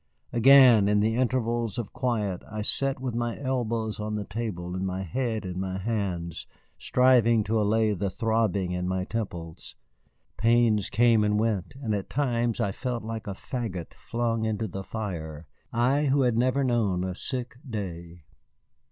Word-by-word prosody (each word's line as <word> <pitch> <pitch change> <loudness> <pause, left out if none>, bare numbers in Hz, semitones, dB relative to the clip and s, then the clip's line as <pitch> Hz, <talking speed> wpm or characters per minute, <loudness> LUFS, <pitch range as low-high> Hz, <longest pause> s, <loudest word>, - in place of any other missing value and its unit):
Again, 120 -3 +7
in 105 0 +3
the 110 +2 +2
intervals 120 -3 0
of 115 -4 -4
quiet, 105 -8 -1
I 105 0 -4
sat 135 +4 +1
with 130 -2 -3
my 120 0 -2
elbows 115 -5 -2
on 105 0 -3
the 105 - -2
table 90 -5 -4
and 95 - -2
my 95 0 -2
head 110 +3 -2
in 90 0 -4
my 95 0 -3
hands, 95 -6 -3 0.3
striving 120 -3 +4
to 110 +1 +1
allay 110 +1 +2
the 100 +1 -2
throbbing 110 -4 0
in 90 0 -2
my 95 0 -1
temples. 90 -8 -5 0.6
Pains 115 -2 +3
came 115 -2 +4
and 105 0 +2
went, 110 -1 -1
and 115 -6 -2
at 100 -2 -3
times 120 -4 0
I 100 - +1
felt 125 +2 -4
like 110 0 -5
a 100 - -4
fagot 105 -8 -5
flung 115 -1 -2
into 110 0 -1
the 95 +1 -6
fire, 85 -8 -5 0.3
I, 130 +5 +2
who 140 0 +3
had 120 -2 +2
never 130 +4 +2
known 110 -8 +1
a 95 0 -2
sick 125 +5 -5
day. 85 -6 -6
110 Hz, 165 wpm, -27 LUFS, 95-120 Hz, 0.6 s, Again